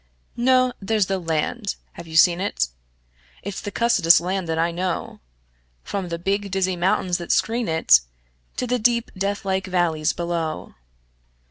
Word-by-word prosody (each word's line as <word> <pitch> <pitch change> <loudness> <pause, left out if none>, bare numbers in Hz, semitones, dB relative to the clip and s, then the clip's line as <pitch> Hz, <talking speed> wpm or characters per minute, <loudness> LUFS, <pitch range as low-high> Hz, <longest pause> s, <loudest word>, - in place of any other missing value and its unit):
No! 255 +1 +3
There's 210 0 +1
the 195 0 -2
land. 170 +6 -2 0.2
(Have 170 - -10
you 160 - -8
seen 175 +2 +5
it?) 65 - -1 0.7
It's 200 0 -5
the - - -5
cussedest 200 -7 +4
land 185 0 -3
that 160 - -1
I 165 +1 +1
know, 180 +1 -3 0.6
From 190 -3 -4
the 170 - -3
big, 200 +3 -1
dizzy 190 -1 0
mountains 180 0 0
that 170 - -4
screen 235 +1 +1
it 160 - +5 0.6
To - - -1
the 250 0 0
deep, 235 +1 +1
deathlike 195 -1 -2
valleys 170 -4 +1
below. 170 -2 -3
185 Hz, 150 wpm, -22 LUFS, 170-205 Hz, 0.7 s, seen